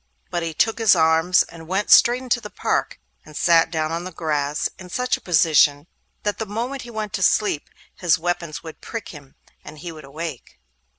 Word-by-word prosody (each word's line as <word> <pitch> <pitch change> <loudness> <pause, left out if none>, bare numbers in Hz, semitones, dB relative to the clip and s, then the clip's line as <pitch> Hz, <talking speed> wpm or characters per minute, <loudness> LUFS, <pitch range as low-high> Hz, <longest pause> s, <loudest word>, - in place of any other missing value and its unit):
But 175 - -1
he 165 -1 -4
took 225 +6 +1
his 220 -5 +5
arms, 160 +2 +4
and 165 -1 -13
went 195 +3 -1
straight 245 +2 +6
into 245 -1 0
the 210 - -8
park, - - -2 0.2
and 155 - -11
sat 165 -1 +4
down 160 -1 -2
on 170 +1 -3
the 185 - -6
grass 150 -3 -1
in 185 -1 -10
such 250 +6 0
a - - -11
position 155 -4 +3 0.4
that 205 -1 -2
the 220 - -3
moment 240 +6 -4
he 240 - -10
went 220 -2 -4
asleep 190 -4 +1 0.3
his 175 -4 +2
weapons 170 -2 -3
would 160 -2 -10
prick 230 -1 -6
him, 145 -4 -13 0.3
and 155 - -11
he 170 +2 -7
would 155 -1 -11
awake. 150 -1 -7
170 Hz, 195 wpm, -22 LUFS, 155-210 Hz, 0.4 s, straight